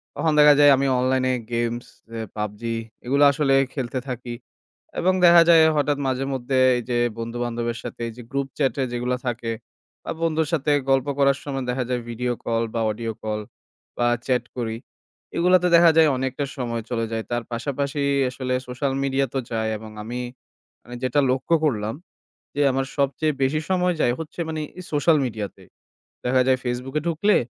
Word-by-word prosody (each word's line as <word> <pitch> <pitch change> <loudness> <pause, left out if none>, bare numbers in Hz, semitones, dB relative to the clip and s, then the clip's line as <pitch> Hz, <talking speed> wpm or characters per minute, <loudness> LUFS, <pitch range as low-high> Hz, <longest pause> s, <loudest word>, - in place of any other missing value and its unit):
তখন 160 - +1
দেখা 150 0 +8
যায় 145 -1 +8
আমি 135 +1 +1
অনলাইনে 130 0 +1 0.2
games, 120 0 -2 0.2
অ্যা 115 0 -5
PUBG, 105 0 -4 0.4
এগুলা 140 +3 +4
আসলে 140 -1 +1 0.2
খেলতে 130 -2 -3
থাকি। 125 -1 -5 0.7
এবং 185 +2 +3
দেখা 170 0 +8
যায়, 165 -1 +8
হঠাৎ 145 -1 +1
মাঝেমধ্যে 130 0 -1 0.2
এই - - -2
যে 120 - +1 0.2
বন্ধু-বান্ধবের 120 0 -3
সাথে, - - -7
এই - - -5
যে - - -8
group 140 0 -1
chat-এ 140 -1 +1
যেগুলা 125 +1 -1
থাকে, 120 -1 -2 0.6
আ - - 0
বন্ধুর 160 -1 +1
সাথে 150 -2 +1 0.2
গল্প 135 +1 +3
করার 140 -1 +3
সময় 135 -2 -3
দেখা 125 +1 0
যায়, 125 -1 -1
video 120 +1 -2
call 115 0 0
বা 115 - -1
audio 115 +1 -4
call 110 0 -3 0.6
বা 120 - +2 0.2
chat 125 -2 +1
করি। 115 -2 -2 0.6
এগুলাতে 180 +1 +4
দেখা 170 0 +7
যায় 160 -1 +7
অনেকটা 130 +2 -2
সময় 120 -3 -2
চলে 115 -2 -1
যায়। 110 0 -2
তার 120 0 -1
পাশাপাশি 140 +4 -2 0.3
আসলে 130 0 -3
social 130 +2 -2
media 135 0 +1
তো 135 - 0
যায়। 110 -1 -1
এবং 110 0 -10
আমি, 120 +3 -4 0.7
আমি 120 0 -8
যেটা 130 +3 +2
লক্ষ্য 130 +6 +1
করলাম 110 -6 0 0.6
যে, 145 - -2
আমার 135 +1 -1
সবচেয়ে 140 +3 +1
বেশি 140 +4 +2
সময় 180 -1 +2
যায় 120 - +3
হচ্ছে, 160 +2 -7
মানে, 160 -1 -3 0.3
social 155 +2 +4
media-তে। 110 -4 -6 0.6
দেখা 125 +1 +3
যায়, 130 -1 +3
Facebook-এ 125 +4 -2
ঢুকলে, 175 +6 +2
130 Hz, 170 wpm, -23 LUFS, 120-145 Hz, 0.7 s, দেখা